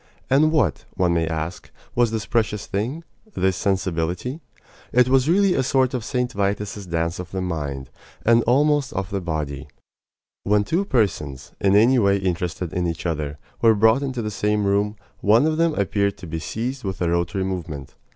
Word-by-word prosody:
And 150 +3 +5
what, 130 - +1
one 90 -2 +2
may 85 -1 +1
ask, 80 +2 -4 0.2
was 120 -1 +3
this 110 -2 -3
precious 105 -1 0
thing 120 +12 -3 0.3
this 95 -1 +1
sensibility? 95 - -1 0.5
It 125 0 +4
was 135 +2 +3
really 195 +1 +4
a 135 - +2
sort 130 0 +2
of 125 -3 -2
St. 125 +1 -1
Vitus's 100 -1 -2
dance 85 0 -1
of 90 -1 -6
the 95 - -4
mind, 70 -7 -4 0.3
and 115 +1 +5
almost 145 +2 +2
of 95 -1 -3
the 100 -1 -2
body. 75 -5 -4 0.8
When 105 0 +3
two 170 - 0
persons, 75 - -1
in 100 0 +4
any 120 +5 +5
way 100 -2 +3
interested 90 -2 -2
in 90 -1 0
each 85 0 -4
other, 75 -3 -2 0.2
were 115 -1 +6
brought 110 +5 +4
into 130 -4 -3
the 105 - -3
same 105 0 0
room, 100 +2 +1 0.2
one 110 +7 +4
of 155 0 +1
them 165 -2 +2
appeared 100 0 0
to 90 - -10
be 80 -1 -4
seized 125 - -4
with 95 -2 -4
a 85 - 0
rotary 85 +3 0
movement. 85 -8 -5
100 Hz, 180 wpm, -23 LUFS, 85-120 Hz, 0.8 s, were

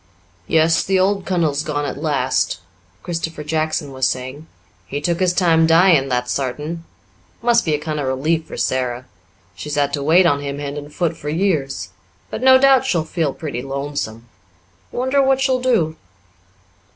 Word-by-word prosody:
"Yes, 160 0 +3
the 190 0 +1
old 195 +1 +1
kunnel's 160 -6 +1
gone 145 -2 -2
at 145 - -5
last," 150 -3 0 0.4
Christopher 165 -3 -4
Jackson 155 -1 -1
was 130 -1 +1
saying. 130 +5 -5 0.4
"He 140 - -3
took 170 +3 -1
his 185 -1 +3
time 165 -3 +3
dyin', 165 -4 +5
that's 125 -1 -1
sartain. 150 +5 -3 0.6
Must 235 0 +4
be 155 -2 +1
a - - -3
kind 155 0 -4
of 140 - -2
relief 155 +5 0
for - - -8
Sara 125 -1 -1 0.5
she's 145 +10 -6
had 145 -1 +1
to 145 - -1
wait 165 +6 +4
on 145 -4 +2
him, 140 0 -4
hand 145 0 -4
and 145 +1 -11
foot, 170 +1 -1
for 150 - -6
years. 155 -5 -1 0.4
But - - -4
no 260 0 +7
doubt 270 -1 +5
she'll 175 -12 0
feel 160 -2 -1
pretty 140 -6 -5
lonesome. 135 -4 -5 0.6
Wonder 260 +3 +1
what 270 0 +3
she'll 260 -1 +1
do?" 215 -12 +1
155 Hz, 170 wpm, -20 LUFS, 140-175 Hz, 0.6 s, no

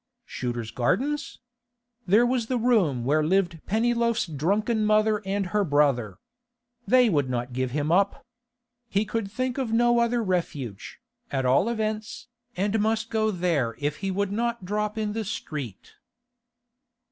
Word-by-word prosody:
Shooter's 120 -3 -4
Gardens? 260 - -1 0.7
There 215 +6 +5
was 240 -2 0
the 255 - 0
room 200 - +2
where 155 +3 +2
lived 175 0 +1
Pennyloaf's 235 +2 +1
drunken 200 - 0
mother 215 0 +3
and 195 0 0
her 210 -1 +3
brother. 140 - +1 0.7
They 250 -1 +5
would 145 - +1
not 125 0 -3
give 130 0 -1
him 145 +4 -1
up. 195 +3 +2 0.6
He 205 +2 +1
could 215 -1 -3
think 255 +4 -2
of 250 -4 -2
no 240 +1 +4
other 235 0 +1
refuge, 145 - -3 0.3
at 135 -2 -1
all 135 - +3
events, 220 0 -3 0.3
and 205 +4 +1
must 220 +1 0
go 220 -1 +1
there 170 - 0
if 145 +3 -2
he 195 - -3
would 200 +1 -1
not 235 -1 -2
drop 210 +2 -2
in 210 -1 -1
the 225 0 -2
street. 150 - -6
200 Hz, 145 wpm, -26 LUFS, 150-225 Hz, 0.7 s, There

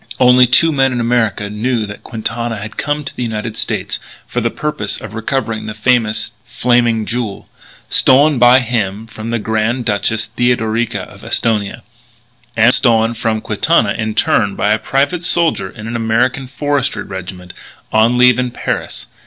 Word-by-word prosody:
Only 125 0 +6
two 165 +7 +4
men 135 -3 +2
in 125 - -2
America 115 -4 0
knew 110 +2 -1
that 105 0 -9
Quintana 115 +1 -4
had 105 +1 -8
come 150 0 -2
to 130 - -8
the - - -6
United 110 -1 -3
States - - -2 0.3
for 120 - -3
the 115 - 0
purpose 135 -7 -3
of 105 0 -9
recovering 115 0 -3
the 110 - -5
famous 110 -1 +1
"Flaming 120 -2 +1
Jewel," 115 -4 -4 0.4
stolen 140 +1 +4
by 125 +2 +6
him 110 -3 -2
from 115 0 -8
the 115 - 0
Grand 110 +3 -1
Duchess 110 +1 -1
Theodorica 115 -3 0
of - - -13
Esthonia; 110 0 -1 0.7
and 115 +3 +5
stolen 115 -2 +3
from 110 -1 -2
Quintana, 110 0 +1
in 110 -1 -3
turn, 105 -2 +2
by 105 - +1
a 110 - +2
private 145 +9 0
soldier 170 -1 +1
in 110 -2 -10
an 115 +1 -5
American 115 +4 0
Forestry 145 0 -1
Regiment, 90 -1 -8 0.4
on 115 +3 +3
leave 125 0 +5
in 125 -1 0
Paris. 120 - -4
115 Hz, 160 wpm, -16 LUFS, 110-125 Hz, 0.7 s, Only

